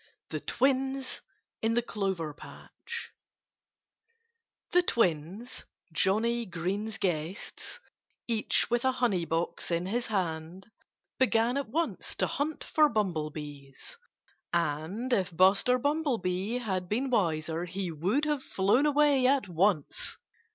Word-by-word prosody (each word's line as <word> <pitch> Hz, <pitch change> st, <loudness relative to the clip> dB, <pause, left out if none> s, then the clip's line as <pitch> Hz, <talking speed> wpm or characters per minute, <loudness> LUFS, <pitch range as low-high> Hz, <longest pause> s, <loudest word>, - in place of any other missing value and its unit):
XVI -, -, -33 dB
THE -, -, -2 dB
TWINS 270 Hz, 0 st, 0 dB, 0.4 s
IN 225 Hz, +1 st, +2 dB
THE 240 Hz, -, +2 dB
CLOVER 190 Hz, -9 st, -2 dB
PATCH -, -, -9 dB, 1.6 s
The 360 Hz, -, +6 dB
twins 195 Hz, -, -1 dB, 0.3 s
Johnnie 225 Hz, +7 st, +1 dB
Green's 195 Hz, +5 st, -3 dB
guests 175 Hz, +1 st, -3 dB, 0.5 s
each 225 Hz, -3 st, +2 dB
with 240 Hz, 0 st, +2 dB
a 260 Hz, 0 st, +3 dB
honey 230 Hz, -9 st, +1 dB
box 165 Hz, +1 st, -2 dB
in 170 Hz, 0 st, 0 dB
his 235 Hz, +6 st, -1 dB
hand, 180 Hz, 0 st, -3 dB, 0.5 s
began 240 Hz, -1 st, +3 dB
at 280 Hz, -4 st, -2 dB
once 330 Hz, +7 st, -2 dB
to -, -, +1 dB
hunt 300 Hz, +2 st, -2 dB
for 305 Hz, -1 st, +4 dB
bumblebees. 155 Hz, -, -4 dB, 0.5 s
And 170 Hz, -, -1 dB
if 185 Hz, -6 st, 0 dB
Buster 195 Hz, +7 st, +5 dB
Bumblebee 240 Hz, -, 0 dB
had 190 Hz, -7 st, -2 dB
been 255 Hz, +5 st, 0 dB
wiser 165 Hz, -5 st, +1 dB
he 180 Hz, 0 st, -3 dB
would 190 Hz, -, 0 dB
have 295 Hz, -3 st, 0 dB
flown 210 Hz, +7 st, +2 dB
away 290 Hz, -3 st, +4 dB
at 265 Hz, -5 st, +3 dB
once. 175 Hz, -2 st, 0 dB
205 Hz, 120 wpm, -30 LUFS, 170-255 Hz, 1.6 s, The